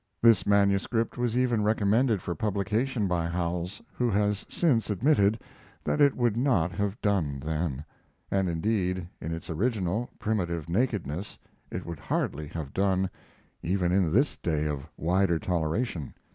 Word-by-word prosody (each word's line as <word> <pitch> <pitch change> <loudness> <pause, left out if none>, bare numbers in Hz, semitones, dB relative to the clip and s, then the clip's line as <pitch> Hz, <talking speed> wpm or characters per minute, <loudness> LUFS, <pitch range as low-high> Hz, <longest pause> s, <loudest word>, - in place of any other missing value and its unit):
This 115 -4 +5
manuscript 100 +3 +2
was 120 -1 0
even 120 -4 +2
recommended 110 0 +2
for 85 - -2
publication 105 - 0
by 85 -2 0
Howells, 85 +2 -3
who 125 -1 0
has 105 -1 0
since 130 -12 +2
admitted 105 - +3 0.4
that 150 - 0
it 140 -1 +5
would 120 -4 +2
not 115 - +2
have 100 +3 -2
done 85 -10 +1
then; 75 -1 -2 0.5
and 95 -2 +1
indeed, 90 0 0
in 80 - -4
its 85 0 -5
original, 105 +4 -1
primitive 85 -7 -1
nakedness 95 - -1 0.3
it 90 - -5
would 85 -3 -6
hardly 75 +1 -2
have 75 -3 -6
done 95 -1 +1 0.5
even 90 0 0
in 90 -4 +2
this 135 - +2
day 75 -4 -1
of 75 -1 -3
wider 90 +1 +2
toleration. 85 - -2
95 Hz, 145 wpm, -28 LUFS, 85-110 Hz, 0.5 s, This